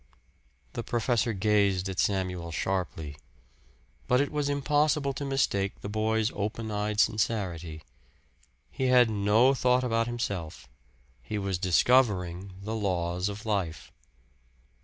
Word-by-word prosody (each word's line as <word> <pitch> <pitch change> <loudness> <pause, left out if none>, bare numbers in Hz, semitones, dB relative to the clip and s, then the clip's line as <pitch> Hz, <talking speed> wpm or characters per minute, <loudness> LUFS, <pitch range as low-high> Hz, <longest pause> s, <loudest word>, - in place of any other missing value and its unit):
The - - -3
professor 120 0 0
gazed 100 -2 +2
at 95 -1 -4
Samuel 90 -4 -1
sharply. 80 -4 -3 0.9
But 125 - +3
it 145 - 0
was 150 -1 -1
impossible 145 0 +1
to 140 - -5
mistake 130 -8 0
the 100 - -5
boy's 110 +2 0
open 110 +2 -3
eyed 105 0 -2
sincerity. 90 -8 0 0.9
He 130 - -2
had 125 -3 +5
no 110 +5 +4
thought 125 -1 +2
about 115 -1 +1
himself 100 -9 -4 0.5
he 105 - -4
was 95 -3 -2
discovering 95 -2 +2
the 110 +2 -4
laws 90 -2 -1
of 105 +2 -7
life. 95 -7 -2
105 Hz, 120 wpm, -28 LUFS, 95-120 Hz, 0.9 s, had